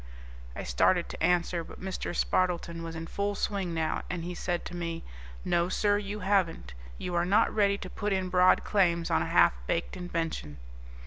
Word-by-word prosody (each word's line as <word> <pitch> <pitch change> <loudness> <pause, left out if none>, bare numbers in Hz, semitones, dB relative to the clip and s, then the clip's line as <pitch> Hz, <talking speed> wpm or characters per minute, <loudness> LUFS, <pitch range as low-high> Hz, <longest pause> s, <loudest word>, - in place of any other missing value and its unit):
I - - -5
started 170 - +2
to - - -5
answer, 175 0 +2
but - - -12
Mr. 185 -2 -4
Spardleton 170 -2 0
was 165 0 -6
in 165 0 -5
full 200 +4 -2
swing 195 -3 -1
now, 160 -1 -1
and 175 -2 -3
he 180 +1 -4
said 175 0 -2
to 180 - -6
me, 170 -1 -4 0.4
"No, 175 +1 +2
sir, 205 +1 +2
you 205 +1 -5
haven't. 185 - 0 0.2
You 180 - -4
are 170 0 +2
not 200 +5 +3
ready 200 -2 +3
to 190 - -7
put 205 +2 -3
in 190 -1 0
broad 180 0 +5
claims 170 -5 +2
on - - +3
a - - -1
half - - +5
baked 85 - -1
invention." 165 - -4
180 Hz, 190 wpm, -29 LUFS, 170-195 Hz, 0.4 s, broad